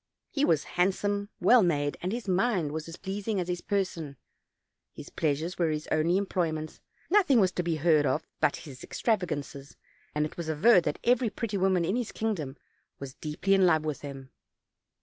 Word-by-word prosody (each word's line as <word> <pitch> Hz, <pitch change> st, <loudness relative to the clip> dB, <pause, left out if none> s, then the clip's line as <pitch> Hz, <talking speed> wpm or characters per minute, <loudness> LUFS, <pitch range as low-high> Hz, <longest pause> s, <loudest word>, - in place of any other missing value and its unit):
He 280 Hz, -, 0 dB
was 160 Hz, -, +3 dB
handsome, 200 Hz, +3 st, 0 dB
well 250 Hz, -1 st, +6 dB
made, 145 Hz, -6 st, +1 dB
and 180 Hz, -, -2 dB
his 235 Hz, -1 st, -4 dB
mind 185 Hz, -5 st, +1 dB
was 155 Hz, +1 st, -5 dB
as 165 Hz, -, -8 dB
pleas 195 Hz, +2 st, -6 dB
ing 215 Hz, -3 st, 0 dB
as 175 Hz, -, -2 dB
his 180 Hz, -1 st, -3 dB
person; 170 Hz, -8 st, -2 dB, 0.8 s
his -, -, -10 dB
pleasures 160 Hz, +4 st, -1 dB
were 170 Hz, -2 st, +2 dB
his 150 Hz, 0 st, -2 dB
only 165 Hz, +4 st, +2 dB
employ 185 Hz, -4 st, 0 dB
ments; 155 Hz, 0 st, -6 dB, 0.3 s
nothing 360 Hz, -, +5 dB
was 190 Hz, -3 st, +3 dB
to 180 Hz, -, -2 dB
be 170 Hz, -2 st, -1 dB
heard 155 Hz, -2 st, +3 dB
of 155 Hz, -, 0 dB
but -, -, +2 dB
his 135 Hz, -4 st, -10 dB
extrava 215 Hz, -6 st, 0 dB
gances; 140 Hz, -2 st, -6 dB, 0.4 s
and 150 Hz, 0 st, +1 dB
it 155 Hz, -, -8 dB
was 170 Hz, -2 st, -4 dB
averred 175 Hz, +5 st, +5 dB
that -, -, -1 dB
every 245 Hz, -1 st, +3 dB
pretty 220 Hz, -1 st, -4 dB
woman 185 Hz, -2 st, +2 dB
in 190 Hz, +6 st, 0 dB
his 245 Hz, -3 st, -2 dB
kingdom 160 Hz, -11 st, -3 dB, 0.4 s
was 135 Hz, -1 st, -8 dB
deeply 155 Hz, +8 st, -1 dB
in 190 Hz, -1 st, +5 dB
love 155 Hz, -2 st, +3 dB
with 150 Hz, -2 st, -3 dB
him. 135 Hz, -2 st, -9 dB
175 Hz, 195 wpm, -28 LUFS, 155-200 Hz, 0.8 s, well